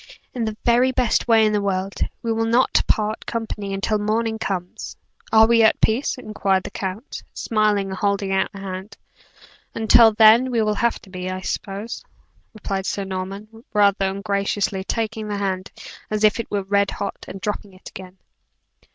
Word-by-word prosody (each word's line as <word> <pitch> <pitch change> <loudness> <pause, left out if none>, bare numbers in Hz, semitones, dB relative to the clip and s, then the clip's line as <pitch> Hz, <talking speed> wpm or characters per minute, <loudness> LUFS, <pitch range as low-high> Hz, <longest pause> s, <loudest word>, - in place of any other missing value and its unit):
"In 240 -3 -2
the 215 -1 -4
very 245 +2 +4
best 245 -2 +1
way 225 -2 +5
in 215 - +1
the 205 - +1
world: 195 0 -2 0.2
we 230 -1 0
will 225 0 0
not 240 +3 +3
part 215 0 0
company 220 -3 -4
until 200 +2 -1
morning 220 +1 -1
comes, 180 -4 -5 0.3
are 220 0 +7
we 230 0 +4
at 220 0 +4
peace?" 235 +6 +1
inquired 200 -5 -1
the - - -7
count, 195 +8 -5
smiling 210 -3 +1
and 190 - -5
holding 200 0 0
out 190 - +1
but 195 -2 -9
hand. 190 +1 -7 0.8
"Until 225 0 +6
then, 220 +4 +6
we 235 -3 +1
will 215 0 +1
have 235 +2 0
to 190 - -16
be, 185 0 -5
I 185 0 -4
suppose," 200 +4 -5 0.5
replied 195 -3 -4
Sir 200 - -2
Norman, 195 +4 -6
rather 200 -1 +3
ungraciously 200 0 -1
taking 220 -1 -3
the 205 -1 -3
hand 190 -2 -3 0.4
as 215 0 -1
if 215 +2 +4
it 230 - -4
were 200 -1 -1
red 200 +1 +1
hot, 200 - -5
and 195 - -8
dropping 205 0 -4
it 185 - -14
again. 185 0 -11
210 Hz, 175 wpm, -22 LUFS, 195-225 Hz, 0.8 s, are